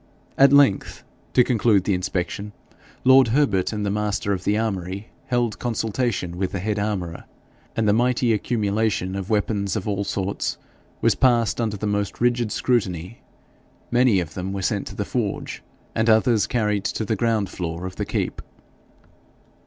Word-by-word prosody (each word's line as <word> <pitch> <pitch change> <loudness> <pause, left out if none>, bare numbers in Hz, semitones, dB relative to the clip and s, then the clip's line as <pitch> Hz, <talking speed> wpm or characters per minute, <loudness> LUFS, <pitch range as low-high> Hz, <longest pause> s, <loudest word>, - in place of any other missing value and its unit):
At 135 0 +6
length, 140 -8 +3 0.3
to 125 - +6
conclude 110 -5 +3
the 100 - +1
inspection, 90 +3 -3 0.5
lord 130 0 +7
Herbert 110 -7 +2
and 105 -2 -3
the 100 - 0
master 105 -1 -1
of 90 -1 -4
the 105 - +2
armoury 100 -2 -3 0.2
held 120 -3 0
consultation 115 -6 -2
with 95 0 -2
the 95 - -2
head 105 +2 -1
armourer, 95 -5 -3 0.5
and 110 -1 +1
the 100 - +4
mighty 120 +1 +2
accumulation 105 -3 0
of 95 -1 -4
weapons 105 -2 0
of 105 -2 -3
all 100 -1 -1
sorts 100 -1 -2 0.4
was - - +4
passed 120 -4 +2
under 110 -3 -1
the 105 - -4
most 105 -1 -1
rigid 120 -2 +1
scrutiny; 95 -5 -1 0.7
many 120 -4 +4
of 80 -3 -4
them 95 +1 -4
were 100 -1 -3
sent - - -1
to - - -8
the - - -2
forge, - - -3 0.3
and 110 +1 +1
others 110 0 +4
carried 105 -4 0
to 110 - -2
the 110 - 0
ground 110 -2 0
floor 85 0 -4
of 95 - -7
the - - -2
keep. - - -2
105 Hz, 165 wpm, -23 LUFS, 95-115 Hz, 0.7 s, lord